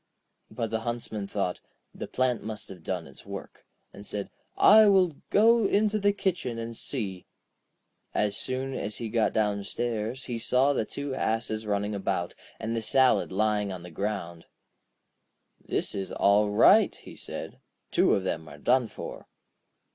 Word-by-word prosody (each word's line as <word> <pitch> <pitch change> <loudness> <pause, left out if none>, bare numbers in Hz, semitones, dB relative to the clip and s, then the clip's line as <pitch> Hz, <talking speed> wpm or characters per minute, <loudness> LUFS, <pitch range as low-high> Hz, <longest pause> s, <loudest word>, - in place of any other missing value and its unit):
But 115 -2 -4
the 110 - 0
Huntsman 115 -3 -4
thought: 95 -3 -2 0.3
'The - - -6
plant 125 -3 0
must 110 0 -5
have 90 -3 -10
done 90 0 -3
its - - -13
work,' - - -9 0.3
and 100 - -10
said: 105 -1 -4 0.3
'I 215 +1 +8
will 185 -6 +4
go 225 0 +5
into 210 +1 +2
the 205 0 +3
kitchen 180 - -2
and 115 0 -5
see.' 100 -8 -3 0.8
As 105 -1 0
soon 130 +4 -3
as 105 -4 -4
he 115 - -4
got 115 0 +2
downstairs 110 +3 -2
he 120 -2 -4
saw 130 +4 +3
the 110 - 0
two 140 +2 -5
asses 110 -3 -1
running 105 0 -1
about, 95 -3 -2 0.3
and 115 +1 -3
the 115 - -1
salad 130 +2 +3
lying 105 0 +1
on 90 -2 -7
the 90 - -10
ground. 85 -2 -4 1.2
'This - - -2
is 95 -1 -4
all 105 +1 +3
right!' 105 - +5
he - - -13
said; - - -7 0.3
'two - - +4
of 95 - -1
them 80 -4 -3
are 70 - -11
done 125 - +2
for.' - - -8
110 Hz, 160 wpm, -28 LUFS, 100-130 Hz, 1.2 s, I